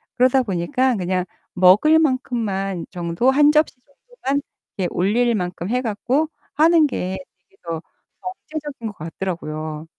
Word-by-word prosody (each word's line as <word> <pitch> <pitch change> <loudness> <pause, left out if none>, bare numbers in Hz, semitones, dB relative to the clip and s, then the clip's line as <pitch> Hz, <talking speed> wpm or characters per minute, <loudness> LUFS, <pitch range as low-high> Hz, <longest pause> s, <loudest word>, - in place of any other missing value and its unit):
그러다 255 +1 +4
보니까 225 +6 0
그냥 185 -1 -1 0.3
먹을 200 - +6
만큼만 220 - -1
정도 175 +7 0
1 295 +2 +5
접시 305 0 +2
정도만 280 - -4 0.4
예 180 - +1
올릴 230 +6 +2
만큼 180 -2 -3
해 250 +2 +1
갖고 255 +7 0 0.2
하는 320 0 +5
게 190 -6 -3 0.3
이게 - - -29
더 165 -2 -4 0.7
경제적인 295 -7 -5
것 210 - -8
같더라고요. 155 -2 -5
220 Hz, 265 characters per minute, -21 LUFS, 180-275 Hz, 0.7 s, 먹을